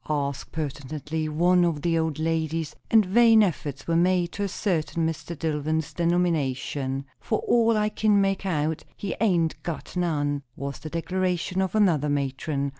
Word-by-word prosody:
asked 140 -2 -2
pertinently 155 +1 -4
one 175 +3 +3
of 160 -4 0
the 170 -1 +2
old 160 -2 0
ladies; 160 -1 -1
and 220 -2 +5
vain 225 +3 +6
efforts 150 -7 -3
were 165 - 0
made 175 0 +2
to 205 - -6
ascertain 175 -5 -1
Mr. 165 +1 -5
Dillwyn's 155 0 -1
denomination. 145 -6 0
"For 220 - -1
all 230 -2 +4
I 210 0 +2
kin 210 -1 +2
make 195 -1 +1
out, 160 -4 -1
he 200 - -3
hain't 175 -7 +1
got 170 +1 -6
none," 145 -5 0
was 140 0 -5
the 155 - -7
declaration 180 +2 -1
of 190 +2 -1
another 170 -9 +3
matron. 140 0 -1
165 Hz, 155 wpm, -25 LUFS, 150-185 Hz, -, vain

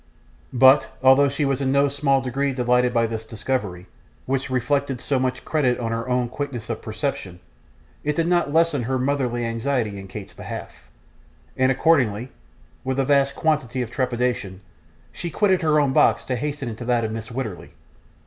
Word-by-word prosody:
But, 130 +2 +5
although 135 +2 +6
she 140 +2 -1
was 135 0 0
in 130 -1 +1
no 140 +1 +4
small 140 -1 +1
degree 135 +2 -1
delighted 125 0 +2
by 115 -1 +2
this 115 -1 -4
discovery, 105 -5 -3 0.4
which 135 0 -1
reflected 135 +1 0
so 135 +1 0
much 130 0 -2
credit 135 -6 +1
on 115 -2 -2
her 115 +2 -3
own 125 -1 +1
quickness 125 -3 -5
of 110 - -5
perception, 110 - -4 0.6
it 150 0 -1
did 165 - +1
not 175 -4 +1
lessen 165 -3 +2
her 130 +3 -1
motherly 130 -3 -1
anxiety 115 -3 -1
in 95 - -9
Kate's 100 +1 -9
behalf; - - -9 0.7
and 130 0 +3
accordingly, 130 -5 +2 0.5
with 130 0 -2
a 135 - +2
vast 140 0 +2
quantity 135 -6 0
of 115 - -8
trepidation, 120 -7 -2 0.5
she 175 - -5
quitted 190 +1 +2
her 155 -2 +3
own 140 -2 +2
box - - +4
to 130 - -2
hasten 145 +1 -3
into 115 +1 -6
that 120 -1 +1
of 110 - -2
Mrs. 110 +1 -6
Wititterly. 115 -8 -5
130 Hz, 175 wpm, -23 LUFS, 115-140 Hz, 0.7 s, although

